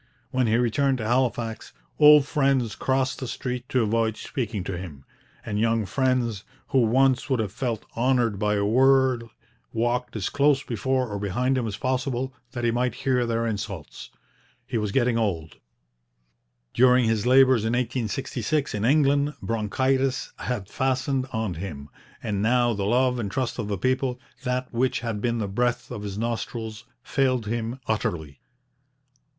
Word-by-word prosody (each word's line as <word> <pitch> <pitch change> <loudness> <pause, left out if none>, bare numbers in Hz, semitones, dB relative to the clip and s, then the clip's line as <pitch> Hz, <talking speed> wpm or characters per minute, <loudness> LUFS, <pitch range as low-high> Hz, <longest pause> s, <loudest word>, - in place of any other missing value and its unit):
When 130 -2 +1
he 110 - +3
returned 130 +3 +2
to 110 - -4
Halifax, 120 -1 -1 0.3
old 150 -1 +8
friends 135 -6 +1
crossed 130 0 0
the 130 - -4
street 125 +1 -4
to 130 -2 +2
avoid 110 0 0
speaking 110 -7 -4
to 95 - -4
him, 80 -7 -8 0.4
and 105 -1 -2
young 115 -1 +1
friends, 120 -2 0 0.3
who 135 - +3
once 130 +3 +3
would 130 -3 +1
have 105 -4 -1
felt 115 -1 -3
honoured 120 -4 +1
by 105 0 +1
a 100 0 +1
word, 130 +1 +4 0.5
walked 120 +2 -1
as 105 -4 -2
close 140 0 +2
before 130 +2 -1
or 105 -2 -4
behind 120 +7 0
him 125 -3 -1
as 100 -2 -4
possible 130 +1 -1 0.2
that 120 -2 -4
he 120 - +3
might 125 +1 0
hear 125 -2 +2
their 115 0 0
insults. 100 -6 -5 0.6
He 125 0 -6
was 105 -2 -2
getting 120 0 +2
old; 85 - -2 1.2
during 125 0 +5
his 110 0 0
labours 130 -2 +6
in 110 +1 0
1866 125 +3 -1
in 105 -1 -2
England 145 +2 +3
bronchitis 130 +5 0
had 120 -7 -3
fastened 130 +2 -1
on 110 -4 -2
him; 80 -5 -7 0.3
and 100 -2 -1
now 120 +2 +3
the 100 -2 -2
love 125 +3 +2
and 105 -4 -2
trust 125 +3 -2
of 110 - -2
the 100 -1 -2
people 130 +3 0 0.2
that 125 0 -2
which 125 +1 0
had 115 -3 -3
been 120 0 0
the 105 -3 -2
breath 120 +4 -1
of 105 - -5
his 100 -1 -5
nostrils 115 -1 -4 0.2
failed 130 -5 +1
him 115 +3 -3
utterly. 80 -10 -2
120 Hz, 160 wpm, -25 LUFS, 110-130 Hz, 1.2 s, old